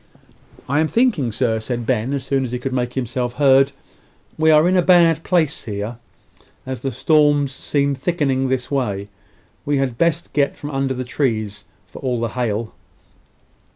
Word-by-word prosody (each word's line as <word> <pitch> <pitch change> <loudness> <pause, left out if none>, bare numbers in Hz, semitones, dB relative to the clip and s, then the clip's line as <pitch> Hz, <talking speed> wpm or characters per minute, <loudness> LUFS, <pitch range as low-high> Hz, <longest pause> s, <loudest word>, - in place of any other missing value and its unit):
"I'm 150 +4 +2
thinking, 215 - +1
sir," 110 0 0
said 120 +1 -4
Ben, 120 0 0
as 140 -2 -2
soon 135 0 0
as 125 - -4
he 125 - -2
could 130 +1 -4
make 125 -1 -2
himself 125 -1 -2
heard, 135 0 +4 0.6
"we 160 0 +2
are 155 +2 +6
in 185 - +2
a 180 - +5
bad 170 -3 +4
place 160 -5 0
here, 105 +2 -4 0.7
as 130 -1 -4
the 135 - -3
storm 145 +2 +3
seems 140 0 -1
thickening 135 -5 0
this 130 0 -2
way. 105 -8 -2 0.5
We 145 0 0
had 130 -3 -1
best 170 0 0
get 140 -1 +1
from 145 - -6
under 135 -1 -1
the 130 - -3
trees, 110 -6 -2 0.2
for - - -12
all 125 -3 -1
the 115 0 -1
hail." 115 -2 -2
135 Hz, 170 wpm, -20 LUFS, 120-145 Hz, 0.7 s, are